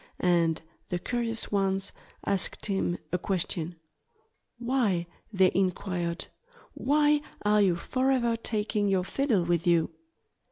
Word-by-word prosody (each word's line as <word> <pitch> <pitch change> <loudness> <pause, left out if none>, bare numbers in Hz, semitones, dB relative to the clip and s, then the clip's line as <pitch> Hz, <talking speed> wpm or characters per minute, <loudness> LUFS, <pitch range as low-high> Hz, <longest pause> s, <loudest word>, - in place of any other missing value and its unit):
And 170 -3 +2 0.3
the 180 - 0
curious 230 +3 -2
ones 195 -1 +1 0.3
asked 195 -2 +1
him 195 -3 0
a 180 - 0
question. 175 -2 -2 0.8
"Why" 235 -8 +1 0.3
they 190 -3 +4
inquired 180 -2 -1 0.5
"why 295 +1 +3 0.2
are 210 0 +4
you 185 -4 +4
forever 255 +4 +1
taking 210 -2 -1
your 190 -2 +2
fiddle 230 -2 +1
with 170 0 0
you?" 170 -2 +3
195 Hz, 115 wpm, -28 LUFS, 175-230 Hz, 0.8 s, they